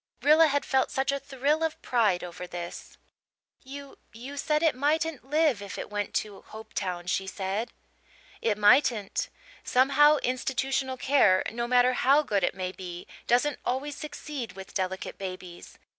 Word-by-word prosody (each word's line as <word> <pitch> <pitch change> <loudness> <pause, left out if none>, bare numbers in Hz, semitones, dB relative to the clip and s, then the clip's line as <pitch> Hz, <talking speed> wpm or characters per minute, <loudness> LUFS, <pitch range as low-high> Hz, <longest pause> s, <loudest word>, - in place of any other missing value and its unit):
Rilla 310 +3 +6
had 285 -1 0
felt 265 -1 +2
such 270 +1 0
a 280 - -1
thrill 285 +4 0
of 320 -1 -2
pride 215 -7 +2
over 180 0 -7
this. 175 -1 -8 0.7
"You 280 +1 -10
you 250 +5 -8
said 300 +2 0
it 320 - +4
mightn't 295 0 -1
live 300 -7 +2
if 200 - -7
it - - -6
went 205 -1 -3
to 205 -2 -3
Hopetown," 195 -5 -5
she 190 +2 -1
said. 200 +4 -3 0.7
"It 215 -3 +1
mightn't. 210 -1 +3 0.3
Somehow, 280 +4 +5
institutional 260 +1 -1
care, 250 -9 +4
no 235 +1 -3
matter 250 +1 +4
how 275 +4 +4
good 200 -8 0
it - - +1
may 185 -1 -3
be, 180 -1 -8 0.2
doesn't 250 +4 +2
always 275 +3 -2
succeed 295 -7 -6
with 195 0 -10
delicate 190 -1 -3
babies. 185 -2 -8
250 Hz, 155 wpm, -27 LUFS, 195-280 Hz, 0.7 s, Rilla